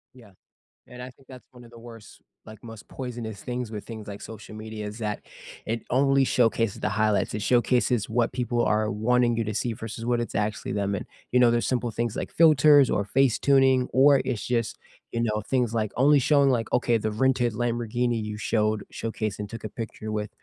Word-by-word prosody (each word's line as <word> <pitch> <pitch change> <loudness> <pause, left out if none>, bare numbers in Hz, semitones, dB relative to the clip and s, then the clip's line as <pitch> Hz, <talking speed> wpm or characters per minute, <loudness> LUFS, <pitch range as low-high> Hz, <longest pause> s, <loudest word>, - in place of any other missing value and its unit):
Yeah. 110 -6 -16 0.6
And 125 0 -10
I 125 - -7
think 130 +2 -22
that's 130 -1 -13
one 125 -1 -15
of 115 - -16
the 120 - -13
worst, 115 -2 -13 0.2
like, 110 0 -13
most 115 -2 -11
poisonous 120 -5 -7
things 125 -2 -4
with 105 -2 -7
things 110 -2 -9
like 100 0 -8
social 110 -1 -10
media 110 0 -7
is 105 +3 -8
that 105 -2 -3 0.4
it 115 +1 -2
only 135 +1 +3
showcases 115 -4 +1
the - - 0
highlights, 110 -1 +1
it 105 - -3
showcases 120 -1 +1
what 115 +1 +1
people 120 -1 -1
are 110 0 +1
wanting 120 +3 +2
you 115 - +1
to 105 - -3
see 120 +2 -2
versus 115 +1 -7
what 120 0 +1
it's 120 - -6
actually 105 -1 -2
them, 100 -1 -1
and, - - -5 0.3
you 125 - +5
know, 120 -1 +6
there's 120 0 0
simple 125 -2 -1
things 115 0 -2
like - - -4
filters 150 -4 +6
or 100 - +1
face 135 +2 +2
tuning 135 -2 +3
or 140 +1 +5
it's 120 -5 -3
just, 115 -3 -1 0.3
you 115 - -2
know, 105 -2 -1
things 120 +1 -1
like 110 -3 -1
only 145 +3 +5
showing, 140 +1 +3
like, 115 -3 -1
okay, 120 -1 +2
the 110 0 -2
rented 125 +1 +1
Lamborghini 120 0 -1
you 105 0 -5
showed 105 -1 0
showcased 110 -3 -4
and 105 -1 -5
took 115 0 -8
a - - -4
picture 110 0 -7
with 105 -1 -3
115 Hz, 210 wpm, -25 LUFS, 110-125 Hz, 0.6 s, know